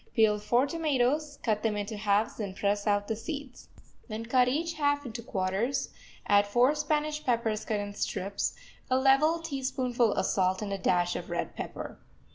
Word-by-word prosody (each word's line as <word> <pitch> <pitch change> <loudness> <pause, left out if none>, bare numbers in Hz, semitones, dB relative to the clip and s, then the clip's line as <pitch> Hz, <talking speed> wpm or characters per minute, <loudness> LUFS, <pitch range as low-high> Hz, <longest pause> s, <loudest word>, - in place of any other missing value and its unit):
Peel 215 -2 +4
four 240 +5 +2
tomatoes, 295 -1 0
cut 215 -3 +1
them 215 -2 0
into 205 +2 -3
halves 205 +1 +1
and 200 -3 -4
press 205 +1 0
out 205 0 +2
the 220 - -1
seeds. 280 +1 -7 0.4
Then 225 -1 -5
cut 250 +1 +3
each 325 +6 0
half 285 -2 +1
into 235 -1 -5
quarters, 215 +5 -1 0.4
add 205 0 +4
four 245 +7 +4
Spanish 300 0 -1
peppers 230 -3 0
cut 215 -2 -1
in 205 0 -4
strips, 200 0 -2 0.3
a 255 - +3
level 275 +5 +4
teaspoonful 260 -6 0
of - - 0
salt 185 +1 +1
and 200 -1 -3
a 195 - -3
dash 175 -1 +2
of - - -5
red - - -3
pepper. - - -6
235 Hz, 175 wpm, -29 LUFS, 205-280 Hz, 0.4 s, Peel